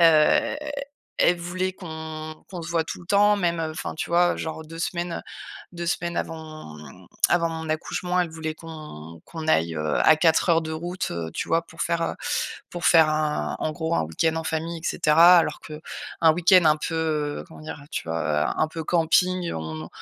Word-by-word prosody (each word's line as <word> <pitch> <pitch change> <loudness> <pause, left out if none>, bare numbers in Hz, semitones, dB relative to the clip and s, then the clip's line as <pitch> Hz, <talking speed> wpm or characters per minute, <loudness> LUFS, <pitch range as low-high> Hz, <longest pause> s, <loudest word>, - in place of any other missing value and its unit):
heu, 165 - +5 0.6
elle 175 - +5
voulait 185 +2 -2
qu'on 160 -3 -7
qu'on 180 -3 -6
se - - -7
voit 165 -1 +1
tout - - -6
le 170 - -14
temps, 205 +1 +5
même, 170 -3 0
heu, 160 -1 -2
enfin, 160 - -5
tu - - -3
vois, 175 +1 +3
genre 160 0 -5
2 165 +1 -10
semaines, 170 0 -2 0.5
2 175 0 -5
semaines 170 0 -1
avant, 155 - -6
mmh, 75 -3 -13 0.2
avant 170 -1 +2
mon 160 -1 -5
accouchement, 180 +3 -1
elle 175 -2 -1
voulait 160 -1 -4
qu'on 150 - -10
qu'on 160 -2 -7
aille, 80 - +2
heu, 75 -1 0
à 160 - +6
4 160 +3 +3
heures 165 -1 +4
de 160 - -5
route, 175 +3 -4
heu, 85 -1 -4
tu - - -3
vois, 165 0 +2
pour 165 - -6
faire, 170 0 0
heu, - - -1 0.6
pour 175 -1 -6
faire 160 -2 +6
un 155 -1 -1
en 155 - -1
gros, 160 +1 -2
un - - +2
week-end 160 - 0
en 160 - -3
famille 165 +1 -2
et 160 - -18
cetera. 170 +4 +6
Alors 155 -2 -1
qu'un 155 +1 -1
week-end 175 0 +5
un 155 0 +5
peu, 165 +2 -3
heu, 155 -2 -1
comment 160 - -13
dire? 155 -1 -7
Tu - - -3
vois, 80 0 -1 0.3
heu, - - -1
un 155 - +3
peu 160 0 -6
camping, 180 +2 +2
on 80 0 -5
160 Hz, 205 wpm, -25 LUFS, 155-170 Hz, 0.6 s, à